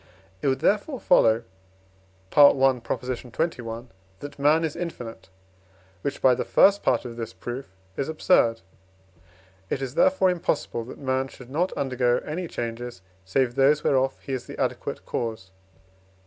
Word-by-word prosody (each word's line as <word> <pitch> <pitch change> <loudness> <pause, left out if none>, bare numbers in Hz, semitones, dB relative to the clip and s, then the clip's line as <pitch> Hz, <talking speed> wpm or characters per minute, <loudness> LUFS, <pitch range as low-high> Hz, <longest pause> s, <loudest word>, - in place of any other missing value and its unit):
It - - -1
would 130 -1 +1
therefore 225 +7 +1
follow 115 - +4 0.9
(I. - - -15
xxi.) 125 -2 +2 0.3
that 145 +3 -9
man 150 +3 +4
is 155 - -4
infinite, 145 - -7 0.7
which 140 - -4
(by 130 - +7
the 125 - -1
first 200 +1 +4
part 125 0 +1
of 120 -1 -7
this 115 -1 -5
proof) 120 -5 -7 0.2
is 140 - -2
absurd. 120 -8 +3 1.1
It - - -1
is, 135 -2 -4
therefore, 275 - +4
impossible, 160 -8 -2
that 125 - -10
man 130 -1 -1
should 125 -1 -14
not 175 +6 0
undergo 125 -2 +1
any 170 +4 -4
changes 120 - -5 0.2
save 120 +5 +1
those 140 +3 +3
whereof 135 0 +2
he 135 - -5
is 130 - -4
the - - -9
adequate - - -3
cause. 110 -5 -4
130 Hz, 145 wpm, -25 LUFS, 120-150 Hz, 1.1 s, by